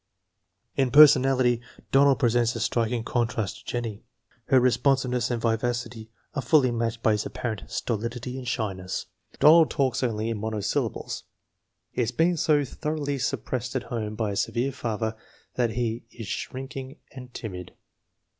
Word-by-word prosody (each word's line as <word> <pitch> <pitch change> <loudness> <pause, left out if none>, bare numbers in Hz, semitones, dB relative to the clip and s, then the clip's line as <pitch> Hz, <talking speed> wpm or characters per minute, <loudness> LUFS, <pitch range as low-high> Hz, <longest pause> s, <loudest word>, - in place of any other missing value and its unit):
In 135 -2 +2
personality 130 -4 +6 0.3
Donald 140 0 +5
presents 120 -2 +2
a - - -3
striking 115 +1 0
contrast 115 -4 -1
to - - -20
Jen 120 -1 -1
nie. 110 -2 -6 0.4
Her 130 - +5
responsiveness 125 -1 +2
and 120 -2 -1
vivacity 115 0 -2 0.2
are 140 - -2
fully 135 -4 +4
matched 115 0 -2
by 110 - +4
his 105 0 0
apparent 110 -4 -4
stolidity 120 +2 -3
and 125 - -8
shyness. 95 -7 -3 0.3
Donald 160 +1 +7
talks 135 -3 0
only 115 -2 -1
in 110 - -3
monosyllables. 110 -1 -2 0.7
He - - -1
has 115 -1 0
been 170 +5 +2
so 150 -2 +2
thoroughly 145 0 -3
suppressed 125 0 -2
at 130 - -1
home 110 -2 -3
by 110 -2 -1
a - - -3
severe 120 +6 0
father 110 -2 -3 0.4
that 120 -2 +1
he 115 0 -2
is 115 -3 -9
shrinking 135 +5 -6
and 125 -2 -10
timid. 90 -7 -7
120 Hz, 150 wpm, -26 LUFS, 115-130 Hz, 0.7 s, Donald